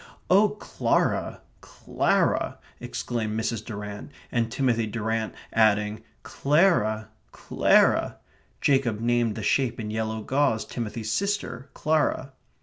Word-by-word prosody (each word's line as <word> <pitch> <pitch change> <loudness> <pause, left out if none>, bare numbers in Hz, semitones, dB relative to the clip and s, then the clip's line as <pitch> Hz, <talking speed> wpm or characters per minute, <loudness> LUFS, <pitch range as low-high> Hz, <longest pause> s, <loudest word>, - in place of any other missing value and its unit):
"Oh, 205 +3 +6
Clara, 210 0 -1 0.2
Clara!" - - 0 0.2
exclaimed 110 -2 -3
Mrs. 110 -1 -2
Durrant, 105 -1 -7 0.2
and 115 -2 0
Timothy 120 -4 +1
Durrant 110 0 -2 0.2
adding, 105 -1 +2 0.2
"Clara, 135 - +2 0.2
Clara," - - +2 0.4
Jacob 135 -6 +2
named 120 -1 +1
the 110 - -5
shape 120 +2 +1
in 105 -1 -4
yellow 110 0 -3
gauze 130 -5 +1
Timothy's 110 -2 -4
sister, 195 - -2
Clara. 150 -3 0
115 Hz, 105 wpm, -26 LUFS, 110-135 Hz, 0.4 s, Oh